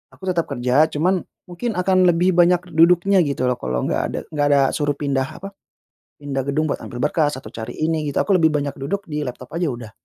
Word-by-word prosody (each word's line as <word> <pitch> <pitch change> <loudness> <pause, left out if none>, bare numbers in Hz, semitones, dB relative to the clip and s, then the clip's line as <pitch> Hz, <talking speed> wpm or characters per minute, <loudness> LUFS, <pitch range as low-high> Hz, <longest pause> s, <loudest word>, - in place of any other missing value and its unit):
aku - - -23
tetap 170 -2 -1
kerja, 135 +3 +2
cuman 180 +4 0 0.2
mungkin 205 +6 -5
akan 185 0 +3
lebih 175 +2 +3
banyak 175 0 +3
duduknya 175 +4 +4
gitu 140 -6 +1
loh 125 - -3
kalau 65 0 -2
nggak - - 0
ada - - -1
nggak 145 -1 +1
ada 145 -1 +4
suruh 145 -1 -1
pindah 135 -2 -1
apa, 195 +7 -9 0.7
pindah 135 -2 -3
gedung 155 +2 0
buat - - -2
ambil 120 0 -7
berkas 150 0 +1
atau 130 - -9
cari 110 +1 -7
ini 155 -1 0
gitu. - - +2
Aku - - -7
lebih 160 -2 +3
banyak 145 -1 -2
duduk 195 +9 -3
di 150 0 -2
laptop 125 0 -8
aja 175 - 0
udah. 120 -6 -5
150 Hz, 215 wpm, -21 LUFS, 135-175 Hz, 0.7 s, duduknya